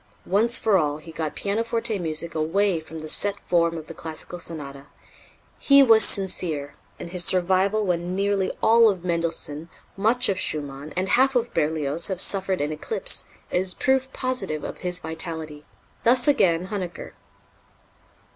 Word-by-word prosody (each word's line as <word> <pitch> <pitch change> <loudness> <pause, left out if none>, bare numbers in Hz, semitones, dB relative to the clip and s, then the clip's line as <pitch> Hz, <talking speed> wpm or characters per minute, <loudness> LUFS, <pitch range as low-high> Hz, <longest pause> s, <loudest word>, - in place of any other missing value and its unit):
Once 225 +5 +2
for 205 -4 +2
all, 150 -2 -1
he 165 +2 -12
got 160 -2 -4
pianoforte 230 +1 -1
music 165 0 -3
away 170 +4 0
from 160 +1 -11
the 155 0 -7
set 200 +5 +1
form 170 -1 +1
of 155 - -8
the 165 - -10
classical 165 +2 -7
sonata. 145 -4 -7 0.7
"He 280 -1 +6
was 225 -4 +6
sincere, 160 -7 +1 0.3
and 170 - -8
his 180 -1 +1
survival 190 +4 +1
when 175 0 -2
nearly 200 -1 0
all 230 0 +6
of 185 -3 -4
Mendelssohn, 165 -2 -2 0.3
much 230 +6 +2
of 190 -2 -1
Schumann, 145 -3 -3
and 185 +1 0
half 265 +2 +3
of 240 -1 0
Berlioz 155 0 +1
have 190 -3 -3
suffered 190 -2 +2
an 145 +1 -2
eclipse, 450 - 0 0.3
is 180 0 0
proof 265 -1 0
positive 210 - -3
of - - -7
his 180 -1 -1
vitality." 160 -2 -5 0.4
Thus 245 +2 +4
again 185 - +2
Huneker. 185 -5 -6
180 Hz, 155 wpm, -24 LUFS, 160-205 Hz, 0.7 s, He